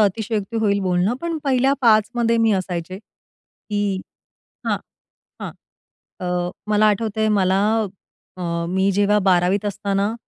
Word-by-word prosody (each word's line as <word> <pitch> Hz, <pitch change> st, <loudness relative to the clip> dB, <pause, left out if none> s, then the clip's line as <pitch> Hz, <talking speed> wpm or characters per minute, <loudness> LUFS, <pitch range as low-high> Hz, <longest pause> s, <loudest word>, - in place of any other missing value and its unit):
अतिशयोक्ती 215 Hz, +1 st, 0 dB
होईल 200 Hz, -2 st, +2 dB
बोलणं, 185 Hz, +4 st, +1 dB
पण 335 Hz, -1 st, -2 dB
पहिल्या 265 Hz, 0 st, +3 dB
5मध्ये 230 Hz, 0 st, +3 dB
मी 220 Hz, -, +4 dB
असायचे, 185 Hz, -1 st, -3 dB
की 205 Hz, -2 st, -6 dB, 0.7 s
हां, -, -, +1 dB, 0.6 s
हां. -, -, -5 dB, 0.7 s
अ, 180 Hz, 0 st, -1 dB, 0.2 s
मला 210 Hz, 0 st, +4 dB
आठवतंय, 220 Hz, +1 st, +1 dB
मला 190 Hz, 0 st, +2 dB, 0.8 s
अ, -, -, -5 dB, 0.3 s
मी 190 Hz, +2 st, +2 dB
जेव्हा 205 Hz, +2 st, +3 dB
12वीत 185 Hz, +2 st, +3 dB
असताना 200 Hz, +1 st, -1 dB
205 Hz, 115 wpm, -21 LUFS, 190-220 Hz, 0.8 s, मी